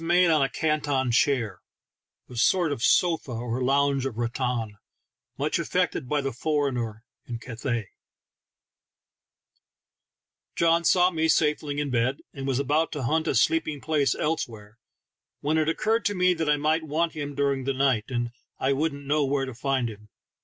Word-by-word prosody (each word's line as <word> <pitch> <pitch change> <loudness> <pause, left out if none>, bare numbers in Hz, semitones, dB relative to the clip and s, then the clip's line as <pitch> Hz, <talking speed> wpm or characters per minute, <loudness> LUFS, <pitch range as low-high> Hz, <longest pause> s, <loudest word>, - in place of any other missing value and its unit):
made 175 +1 +4
on 155 -2 +3
a 135 - +2
"Canton 145 -4 0
chair," 115 -6 +1 0.7
a 125 - -11
sort 165 +7 +3
of 140 - -3
sofa 165 -3 +2
or 120 +2 -3
lounge 140 0 +2
of 115 -4 -7
rattan, 120 -3 -2 0.6
much - - 0
affected 125 - -1
by 150 -1 +1
the 135 -2 -3
foreigner 125 -6 -1 0.2
in 120 - -4
Catha3L 120 -1 -3 2.7
John 170 0 +3
saw 180 +1 +4
me 160 -2 0
safely 150 -2 +1
in 145 -2 -2
bed, 125 +3 0
and 135 -1 -5
was 135 -2 +1
about 150 +4 +1
to 145 -4 -4
hunt 160 +6 0
a - - +1
sleeping 155 +4 +2
place 145 -4 +1
elsewhere, 115 -8 -3 0.6
when 155 +2 +1
it 155 0 +1
occurred 220 +6 +1
to 205 - +1
me 180 0 +3
that 160 -3 -2
I 150 - +4
might 155 +3 +1
want 160 +2 -1
him 145 -2 -5
during 140 -2 0
the 135 - 0
night, 130 -5 +1
and 120 -2 -2 0.3
I 135 +1 +1
wouldn't 140 0 -2
know 150 +1 +2
where 135 0 0
to 130 - -7
find 130 0 -1
him. 105 -1 -10
140 Hz, 165 wpm, -26 LUFS, 125-155 Hz, 2.7 s, made